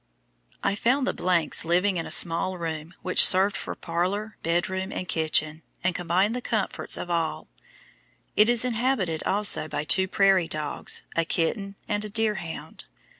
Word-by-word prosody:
I 200 Hz, -, +1 dB
found 250 Hz, +6 st, +1 dB
the 180 Hz, -9 st, +1 dB
s -, -, +2 dB
living 180 Hz, +3 st, +1 dB
in 165 Hz, -, -3 dB
a -, -, -8 dB
small 175 Hz, +2 st, +3 dB
room 165 Hz, 0 st, -6 dB
which 185 Hz, -, +5 dB
served 195 Hz, +2 st, +4 dB
for -, -, -5 dB
parlor, 190 Hz, +6 st, -3 dB
bedroom, 185 Hz, +3 st, -1 dB
and 185 Hz, -, -5 dB
kitchen, 155 Hz, -1 st, +1 dB, 0.2 s
and 185 Hz, -, +1 dB
combined 180 Hz, +6 st, 0 dB
the 250 Hz, -, -3 dB
comforts 220 Hz, -4 st, -1 dB
of 175 Hz, -, -6 dB
all. 165 Hz, -2 st, -2 dB, 0.9 s
It 210 Hz, +2 st, +5 dB
is 240 Hz, 0 st, +2 dB
inhabited 230 Hz, -9 st, -1 dB
also 205 Hz, -5 st, +4 dB
by 150 Hz, -, -3 dB
two 190 Hz, +5 st, +2 dB
prairie 195 Hz, -3 st, +3 dB
dogs, 155 Hz, -2 st, -3 dB
a 165 Hz, -, +2 dB
kitten, 195 Hz, +5 st, -2 dB
and 205 Hz, 0 st, -1 dB
a 210 Hz, -, -5 dB
deerhound. 210 Hz, -, -4 dB
185 Hz, 160 wpm, -25 LUFS, 165-205 Hz, 0.9 s, which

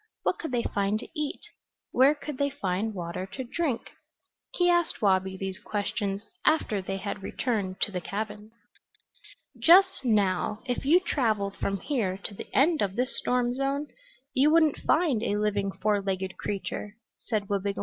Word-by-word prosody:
What -, -, 0 dB
could 320 Hz, -, -4 dB
they 240 Hz, -2 st, +1 dB
find 200 Hz, +1 st, 0 dB
to -, -, -7 dB
eat? 300 Hz, -1 st, -3 dB, 0.5 s
Where 270 Hz, +4 st, +5 dB
could 295 Hz, -2 st, -7 dB
they 280 Hz, 0 st, +2 dB
find 210 Hz, -5 st, -2 dB
water 175 Hz, +1 st, -4 dB
to 260 Hz, -, -4 dB
drink? 265 Hz, -1 st, -2 dB, 0.6 s
He 355 Hz, -, +3 dB
asked 345 Hz, -1 st, +2 dB
Wabi 190 Hz, -2 st, +2 dB
these 190 Hz, 0 st, -4 dB
questions 205 Hz, -1 st, -2 dB, 0.2 s
after 225 Hz, -10 st, +2 dB
they 195 Hz, +1 st, -3 dB
had 200 Hz, +1 st, -4 dB
returned 195 Hz, -3 st, -2 dB
to 205 Hz, -, +2 dB
the 180 Hz, -2 st, -3 dB
cabin. 210 Hz, +2 st, -5 dB, 1.1 s
"Just 375 Hz, -1 st, +6 dB
now, 210 Hz, -2 st, +1 dB
if 250 Hz, 0 st, -2 dB
you 340 Hz, +6 st, +6 dB
traveled 215 Hz, -, 0 dB
from 195 Hz, -1 st, -2 dB
here 215 Hz, -10 st, -1 dB
to 200 Hz, -, -6 dB
the -, -, -8 dB
end 310 Hz, +3 st, +3 dB
of 195 Hz, -1 st, 0 dB
this 250 Hz, +2 st, -1 dB
storm 245 Hz, -1 st, +1 dB
zone 275 Hz, +3 st, -1 dB, 0.4 s
you 275 Hz, +3 st, +4 dB
wouldn't 315 Hz, -2 st, +4 dB
find 310 Hz, -9 st, +2 dB
a 205 Hz, -2 st, 0 dB
living 205 Hz, -2 st, 0 dB
four 205 Hz, +1 st, 0 dB
legged 190 Hz, -1 st, -2 dB
creature," 205 Hz, +1 st, -4 dB, 0.2 s
said 215 Hz, -4 st, -2 dB
Wabigoon. 200 Hz, 0 st, -1 dB
215 Hz, 165 wpm, -28 LUFS, 195-275 Hz, 1.1 s, Just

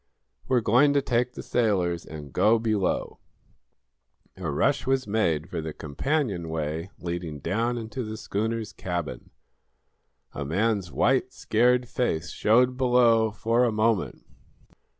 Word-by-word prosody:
"We're 125 Hz, -2 st, +2 dB
going 125 Hz, +7 st, +4 dB
to 140 Hz, -, +3 dB
take 125 Hz, -1 st, 0 dB
the -, -, -8 dB
sailors 90 Hz, -8 st, 0 dB
and 75 Hz, -3 st, -9 dB
go 110 Hz, +2 st, +4 dB
below." 110 Hz, -4 st, -1 dB, 1.2 s
A -, -, -4 dB
rush 130 Hz, -, +1 dB
was 135 Hz, -1 st, +1 dB
made 85 Hz, -7 st, 0 dB
for 80 Hz, -, -4 dB
the 80 Hz, -1 st, -5 dB
companionway 80 Hz, -, -2 dB
leading 85 Hz, -3 st, -5 dB
down 115 Hz, -, -1 dB
into 115 Hz, +3 st, -5 dB
the 110 Hz, 0 st, -6 dB
schooner's 110 Hz, +2 st, -3 dB
cabin. 85 Hz, -5 st, -5 dB, 1.0 s
A 70 Hz, -, -4 dB
man's 95 Hz, +4 st, 0 dB
white, 130 Hz, 0 st, +1 dB
scared 125 Hz, +2 st, +2 dB
face 100 Hz, -11 st, -2 dB
showed 125 Hz, +4 st, +3 dB
below, 120 Hz, -3 st, +4 dB
for 115 Hz, +3 st, +1 dB
a 120 Hz, -, +2 dB
moment. 110 Hz, -2 st, 0 dB
110 Hz, 130 wpm, -26 LUFS, 85-125 Hz, 1.2 s, going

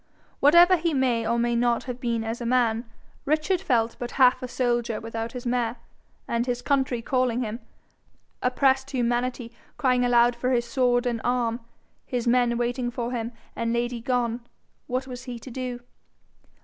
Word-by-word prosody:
Whatever 345 Hz, +5 st, +7 dB
he 330 Hz, -2 st, -1 dB
may 245 Hz, -4 st, +1 dB
or 235 Hz, -, +1 dB
may 240 Hz, 0 st, +1 dB
not 235 Hz, 0 st, +1 dB
have 250 Hz, -1 st, -6 dB
been 235 Hz, -3 st, -1 dB
as 225 Hz, +2 st, -4 dB
a -, -, -3 dB
man, 235 Hz, -2 st, +2 dB, 0.4 s
Richard 310 Hz, +5 st, +1 dB
felt 230 Hz, -3 st, +1 dB
but 245 Hz, -, -4 dB
half 255 Hz, -2 st, +5 dB
a 255 Hz, -, -4 dB
soldier 240 Hz, -3 st, -1 dB
without 225 Hz, 0 st, -5 dB
his 250 Hz, -1 st, -7 dB
mare, 240 Hz, -1 st, 0 dB, 0.5 s
and, 235 Hz, +1 st, -1 dB
his 245 Hz, 0 st, -2 dB
country 265 Hz, -4 st, 0 dB
calling 255 Hz, -1 st, +1 dB
him, 220 Hz, +1 st, -4 dB, 0.8 s
oppressed 265 Hz, +1 st, +2 dB
humanity 245 Hz, -1 st, -1 dB, 0.3 s
crying 250 Hz, -2 st, +2 dB
aloud 240 Hz, 0 st, +4 dB
for 250 Hz, +1 st, -1 dB
his 240 Hz, -2 st, +1 dB
sword 245 Hz, 0 st, +1 dB
and 235 Hz, -2 st, -1 dB
arm, 240 Hz, -1 st, 0 dB, 0.4 s
his 245 Hz, -2 st, -3 dB
men 240 Hz, -1 st, +3 dB
waiting 240 Hz, +1 st, -1 dB
for 240 Hz, 0 st, -4 dB
him, 235 Hz, -1 st, -3 dB, 0.2 s
and 230 Hz, 0 st, -1 dB
Lady 240 Hz, 0 st, -1 dB
gone, 240 Hz, -1 st, -1 dB, 0.5 s
what 255 Hz, +1 st, -2 dB
was 250 Hz, -1 st, -8 dB
he 245 Hz, -2 st, -6 dB
to 250 Hz, +3 st, -10 dB
do? 250 Hz, -1 st, -5 dB
245 Hz, 170 wpm, -25 LUFS, 235-255 Hz, 0.8 s, Whatever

